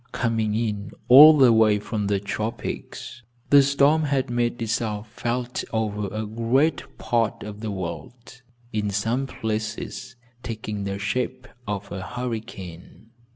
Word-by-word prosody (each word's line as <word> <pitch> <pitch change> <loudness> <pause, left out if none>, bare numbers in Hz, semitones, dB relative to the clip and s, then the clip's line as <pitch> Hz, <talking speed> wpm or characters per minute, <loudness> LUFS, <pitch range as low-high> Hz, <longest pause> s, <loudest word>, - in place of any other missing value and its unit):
Coming 110 -3 0
in 105 -3 -2 0.2
all 150 +5 +10
the 130 -4 +6
way 110 -2 +4
from 105 0 -3
the 100 -1 +1
tropics 110 +4 -5 0.3
the 145 0 +9
storm 140 +3 +3
had 135 -3 0
made 120 0 0
itself 110 -2 -2
felt 120 +1 -3
over 105 -2 -1
a 110 +1 -3
great 125 +5 0
part 115 -3 0
of 105 0 -8
the 110 0 -4
world, 110 +7 -7 0.3
in 105 -1 -1
some 115 +7 -1
places 110 +1 -4 0.3
taking 105 -3 -5
the 100 0 -3
shape 105 +5 -3 0.2
of 100 -1 -4
a 95 - -5
hurricane. 110 -3 -7
110 Hz, 135 wpm, -24 LUFS, 105-125 Hz, 0.3 s, all